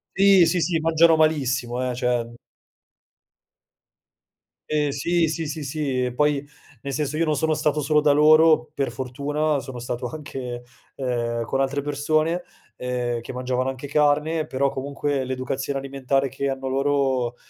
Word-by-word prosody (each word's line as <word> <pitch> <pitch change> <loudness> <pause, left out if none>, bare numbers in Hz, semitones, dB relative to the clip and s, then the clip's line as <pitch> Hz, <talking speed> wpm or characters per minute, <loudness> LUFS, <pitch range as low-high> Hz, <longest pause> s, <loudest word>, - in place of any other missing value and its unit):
Sì, 195 -2 +6
sì, 170 +2 +1
sì, 170 0 +1
mangiano 165 +1 +4
malissimo, 130 -5 +1
eh, 125 - -3
cioè 125 -1 0 2.4
Ehm, 150 -1 +1
sì, 165 +4 +1
sì, 160 0 -3
sì, 155 +1 -5
sì, 135 -3 -1
e 125 - -3
poi 145 +1 +1 0.4
nel 140 -1 -5
senso 150 +1 -2
io 165 - +2
non 155 -1 +1
sono 160 +3 +1
stato 150 0 0
solo 150 +1 +3
da 150 -1 +4
loro, 155 +1 +5
per 140 -2 -2
fortuna 145 +4 -1
sono 130 -2 -8
stato 125 +1 -4
anche, 125 -4 -6 0.3
ehm, 120 -3 -2
con 135 - -2
altre 140 +1 0
persone, 155 +4 0 0.3
ehm, 125 -1 -2
che 120 - -8
mangiavano 125 +1 -1
anche 135 +2 -6
carne, 150 +2 +1
però 140 +1 0
comunque 135 0 -2
l'educazione 130 +2 -3
alimentare 135 0 -1
che 140 +2 -3
hanno 135 0 -4
loro, 135 -3 0
140 Hz, 150 wpm, -23 LUFS, 130-155 Hz, 2.4 s, Sì